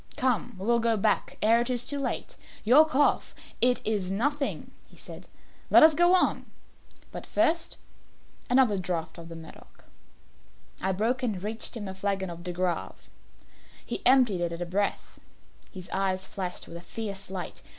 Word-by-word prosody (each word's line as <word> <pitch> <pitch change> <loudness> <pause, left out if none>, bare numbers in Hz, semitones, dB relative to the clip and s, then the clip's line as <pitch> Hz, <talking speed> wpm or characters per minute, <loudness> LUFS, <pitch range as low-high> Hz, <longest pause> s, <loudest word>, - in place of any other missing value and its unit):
Come, 255 -9 0
we 190 - -6
will 235 +1 +3
go 230 -1 +1
back 195 - 0
ere 230 +2 +4
it 240 - -2
is 245 -1 -1
too 285 - -4
late. 280 - -3 0.3
Your 280 +8 +6
cough 290 -1 +1
" - - -20
"It 245 - -4
is 205 -4 -1
nothing," 280 +9 -1 0.2
he - - -19
said; - - -11 0.4
"let - - +7
us 315 0 +8
go 345 +4 +4
on. 365 - +1 0.6
But - - -8
first, 330 +1 0 0.7
another 245 -6 +3
draught 175 -2 -4
of 165 0 -10
the 165 - -8
Medoc." 160 -1 -14 1.0
I 190 - 0
broke 225 +7 0
and 210 -7 -2
reached 220 +3 -2
him 205 -3 -6
a 190 - -5
flagon 190 -1 -2
of 170 0 -9
De 180 - -4
Grave. 175 0 -3 0.8
He - - -4
emptied 250 -8 +4
it 170 -1 -1
at 170 - -6
a 175 - -3
breath. 200 +4 -3 0.5
His 185 -2 -9
eyes 190 -1 -1
flashed 185 -2 -5
with 170 - -8
a - - -10
fierce 195 0 -6
light. 190 -2 -6
205 Hz, 175 wpm, -27 LUFS, 185-255 Hz, 1.0 s, us